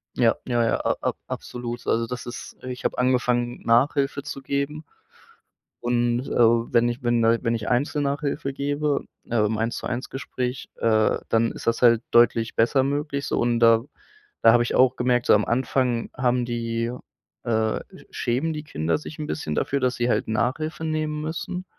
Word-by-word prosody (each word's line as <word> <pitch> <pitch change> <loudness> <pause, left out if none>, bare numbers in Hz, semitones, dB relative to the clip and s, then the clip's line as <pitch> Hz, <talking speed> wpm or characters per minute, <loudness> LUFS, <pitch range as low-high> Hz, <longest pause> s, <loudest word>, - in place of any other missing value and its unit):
Ja, 120 -2 +3
ja, 120 -2 +1
ja, 115 - +2
a - - +3
ab - - -1
absolut. 120 -1 -6
Also 115 0 +2
das 125 +1 -6
ist 120 - -8
ich 125 -1 -6
habe - - -1
angefangen 125 -1 +1
Nachhilfe 135 +4 +2
zu 140 -1 -6
geben, 140 +3 -2 1.0
und, 120 +1 0
äh, - - -8
wenn 115 0 +4
ich 120 +3 -6
wenn 120 -1 +2
da 115 +1 +3
wenn 115 -1 +1
ich 110 -2 -3
Einzel-Nachhilfe 140 +1 -1
gebe, 145 +1 -1 0.3
äh, 120 - 0
im 110 +1 -1
1 115 +1 -1
zu - - -7
1 125 +1 -3
Gespräch, 130 -1 -4
äh, 110 -1 +2
dann 115 0 +2
ist - - -10
das 115 - +1
halt 115 -1 +5
deutlich 115 -1 +4
besser 120 +4 +3
möglich 140 +1 -2
so, - - -1
und 120 -1 +1
da 115 -1 +6 0.6
da 115 - +7
habe 120 0 +5
ich - - -3
auch 130 0 +4
gemerkt, 125 0 +1
so - - +6
am 105 - +3
Anfang 125 -1 0
haben 125 -1 +1
die, 115 0 -2 0.5
äh, 110 -2 0 0.2
sch - - -16
schämen 135 +7 -1
die 150 0 -5
Kinder 80 - -1
sich 155 0 -10
'n 150 - -4
bisschen 75 - -3
dafür, 140 - 0
dass 125 -1 +1
sie 120 0 0
halt - - +1
Nachhilfe 145 +9 -1
nehmen 155 -1 -2
müssen 170 +3 -4
120 Hz, 185 wpm, -24 LUFS, 115-140 Hz, 1.0 s, da